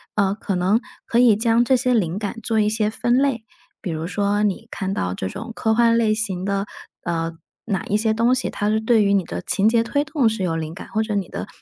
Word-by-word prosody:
呃， 200 -1 +2
可 205 - -4
能 185 +5 +2 0.3
可 235 - 0
以 240 -3 +6
将 230 +2 +3
这 260 - +4
些 250 0 +1
灵 190 -5 0
感 210 0 -4
做 225 -2 +1
一 210 0 +3
些 215 -1 0
分 240 +3 +1
类， 265 -5 +1 0.4
比 190 - -4
如 160 -1 -3
说 205 +3 0
你 210 +2 -1
看 190 -1 -3
到 90 - -2
这 95 0 -4
种 230 - -7
科 220 - +1
幻 230 0 +4
类 220 -2 +3
型 195 -4 -2
的， 200 0 -1 0.4
呃， 165 -1 -2 0.3
哪 195 -5 -1
一 205 - -1
些 220 0 +1
东 230 +3 +3
西 255 - -1
它 205 - -2
是 215 +1 +2
对 220 0 +3
于 200 0 +2
你 195 -2 +3
的 - - -5
情 200 - +1
节 230 0 +3
推 285 +5 0
动 280 -4 +1
是 220 -3 -3
有 170 -3 0
灵 160 0 -4
感， - - -10
或 220 - 0
者 215 -1 -2
你 195 -3 -2
的 - - -5
215 Hz, 270 characters per minute, -22 LUFS, 195-230 Hz, 0.4 s, 以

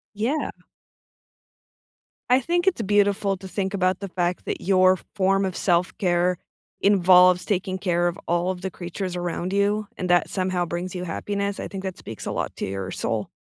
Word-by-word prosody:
Yeah. 245 +9 0 1.8
I 255 +1 +6
think 345 +6 0
it's 380 -10 +2
beautiful 205 -1 +2
to 190 +1 -10
think 190 0 -2
about 185 -1 +1
the 200 - -5
fact 180 -1 -2
that - - -3
your 185 0 +4 0.2
form 195 -1 +2
of 190 -2 -2
self-care 175 0 +1 0.4
involves 180 -2 +5
taking 190 -1 -1
care 175 -2 +1
of 175 +2 -5
all 175 +1 +1
of 185 -1 -4
the 190 - -3
creatures 180 +1 -5
around 175 +1 -3
you 205 +1 +1
and 185 - -2
that 175 0 +3
somehow 185 -2 0
brings 175 +2 -4
you 180 0 -4
happiness, 200 +3 -3
I - - -4
think 195 -2 -6
that 190 -2 -4
speaks 110 - -8
a - - -2
lot - - -3
to - - -3
your 95 -1 -4
soul. - - -2
185 Hz, 180 wpm, -24 LUFS, 180-200 Hz, 1.8 s, I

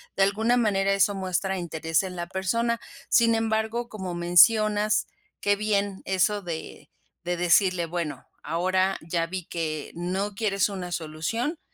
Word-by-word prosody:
De 195 - +3
alguna 220 +5 +2
manera 195 -4 +2
eso 200 +1 +2
muestra 190 0 -1
interés 165 -1 -1
en 185 -1 -6
la 175 -1 -4
persona. 230 +6 -1 0.3
Sin 230 -1 +4
embargo, 225 +1 -1
como 190 -4 -5
mencionas, 210 +4 +4 0.3
que 205 0 +3
bien 200 -2 -1
eso 200 +2 +1
de 170 -4 -7 0.3
de 175 0 -2
decirle: 180 0 +3
"Bueno, 165 -6 -4 0.2
ahora 185 +4 +1
ya 165 +1 -1
vi 185 0 -5
que 155 -3 -4
no 190 +4 -2
quieres 200 -2 +1
una 185 -3 -6
solución, 170 - -3
190 Hz, 145 wpm, -26 LUFS, 175-210 Hz, 0.3 s, Sin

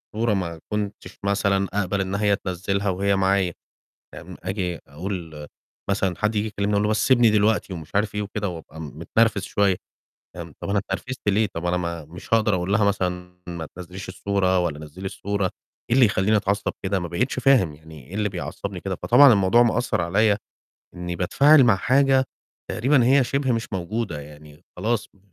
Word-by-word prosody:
صورة 115 0 +1
ما 85 -4 -3
كنتش 105 -1 -4
مثلًا 100 -1 +1
أقبل 100 -1 0
إن 95 +1 -2
هي 100 -1 +2
تنزّلها 100 +1 -2
وهي 100 +2 +1
معايا، 95 -2 +2 0.6
فاهم، - - -10
آجي 90 -2 -3
أقول 80 -1 -6 0.4
مثلًا 95 -2 0
حد 105 +1 0
ييجي 105 +1 0
يكلّمني 105 -1 -2
أقول 100 - +2
له 105 - +1
بس 110 - +1
سِبني 120 -3 +5
دلوقتي 105 -2 +2
ومش 80 +1 -9
عارف 105 0 +1
إيه 105 - -1
وكده، 105 0 -3
وأبقى 80 -2 -9
م 75 0 -9
متنرفِز 110 +4 +2
شوية، 100 -2 +2 0.6
فاهم، - - -8
طَب - - -5
أنا 100 0 +2
اتنرفِزت 105 +6 -6
ليه، 105 +2 +2
طَب 85 +1 -4
أنا 90 +1 +1
ما 85 -3 -4
مش 85 +8 -7
هاقدر 110 -3 +3
أقول 90 +2 -2
لها 105 0 +3
مثلًا 90 -3 -2
ما 85 -3 -5
تنزّليش 90 +1 -8
الصورة 95 -1 +1
ولا 80 -4 -2
نزّلي 80 +5 -10
الصورة، 100 +1 -2 0.4
إيه 120 - +3
اللي 130 - +7
يخلّيني 105 +1 +2
أتعصّب 100 0 -1
كده 95 0 0
ما 85 - -4
بقيتش 120 +10 -1
فاهم، 120 - +4
يعني 80 -4 -14
إيه 100 - -9
اللي 105 -1 0
بيعصّبني 90 -2 -5
كده، - - -3
فطبعًا 140 -3 +6
الموضوع 100 +4 +4
مأثّر 120 -5 +1
عليَّ 100 +4 +2 0.6
إنّي 90 0 -5
باتفاعل 140 - +5
مع 110 -5 +4
حاجة 135 +4 +3 0.5
تقريبًا 130 +2 +3
هي 135 0 +5
شِبه 135 0 0
مش 115 -1 -3
موجودة 95 -3 -3
يعني، 75 +1 -14
خلاص 110 +4 -1
م 100 - -26
100 Hz, 185 wpm, -23 LUFS, 90-105 Hz, 0.6 s, اللي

